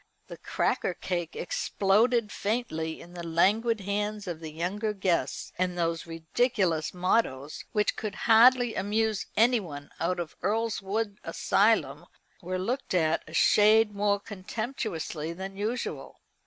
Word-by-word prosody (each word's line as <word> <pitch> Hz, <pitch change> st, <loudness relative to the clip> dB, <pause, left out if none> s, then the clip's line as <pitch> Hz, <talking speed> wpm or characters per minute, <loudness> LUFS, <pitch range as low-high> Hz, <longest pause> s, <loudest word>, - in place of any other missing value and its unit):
The -, -, -10 dB
cracker -, -, -1 dB
cake 175 Hz, -3 st, -3 dB
exploded 215 Hz, +5 st, +1 dB
faintly 200 Hz, -8 st, -2 dB
in 175 Hz, -, -13 dB
the 175 Hz, -, -7 dB
languid 205 Hz, +7 st, +2 dB
hands 205 Hz, +2 st, -2 dB
of 175 Hz, -4 st, -5 dB
the 160 Hz, -1 st, -7 dB
younger 195 Hz, +7 st, -2 dB
guests, 190 Hz, -4 st, -1 dB
and 180 Hz, -1 st, 0 dB
those 165 Hz, -1 st, -1 dB
ridiculous 165 Hz, 0 st, 0 dB
mottoes, 175 Hz, -6 st, -1 dB
which 210 Hz, -1 st, +1 dB
could 210 Hz, -3 st, -4 dB
hardly 245 Hz, +1 st, +6 dB
amuse 215 Hz, +2 st, 0 dB
anyone 200 Hz, -, +1 dB
out 180 Hz, +2 st, 0 dB
of 170 Hz, -2 st, -5 dB
Earlswood 210 Hz, -1 st, -1 dB
Asylum, -, -, +1 dB, 0.3 s
were 185 Hz, +1 st, -3 dB
looked 235 Hz, +3 st, -2 dB
at 160 Hz, -2 st, +2 dB
a -, -, -12 dB
shade 215 Hz, 0 st, +5 dB
more 200 Hz, 0 st, +1 dB
contemptuously 195 Hz, -, -4 dB
than 190 Hz, +2 st, -7 dB
usual. 220 Hz, +5 st, -4 dB
200 Hz, 130 wpm, -28 LUFS, 170-220 Hz, 0.3 s, hardly